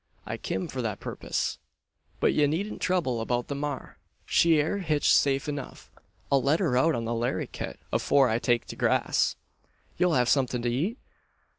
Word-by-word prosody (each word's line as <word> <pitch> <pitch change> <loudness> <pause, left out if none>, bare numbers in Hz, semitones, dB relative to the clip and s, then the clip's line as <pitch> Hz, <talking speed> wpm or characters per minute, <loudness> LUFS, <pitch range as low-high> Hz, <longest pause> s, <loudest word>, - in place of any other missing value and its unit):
"I - - -4
kim 95 - -3
for 130 - -4
that 110 -4 -3
purpiss. - - -3 0.6
But - - +3
ye 150 -1 +3
needn't 185 +9 -3
trouble 155 -11 0
about 120 +1 -1
the - - -1
maar: 145 -1 -5 0.3
she 165 -2 +4
air 160 +7 0
hitched 155 -6 +2
safe 140 0 +2
enuf. 145 -2 -6 0.4
I'll 140 -1 +4
let 145 +6 +2
her 160 -10 +1
out 155 +6 +3
on 115 - -3
the 115 - -1
laryitt, 120 +2 -3 0.2
afore 135 -2 +4
I 115 0 +1
take 120 -1 +1
to - - -6
grass." - - +1 0.6
"You'll 180 -2 +3
have 125 -2 +3
something 125 -2 +1
to 120 - +1
eat? 170 - -1
140 Hz, 175 wpm, -27 LUFS, 120-160 Hz, 0.6 s, she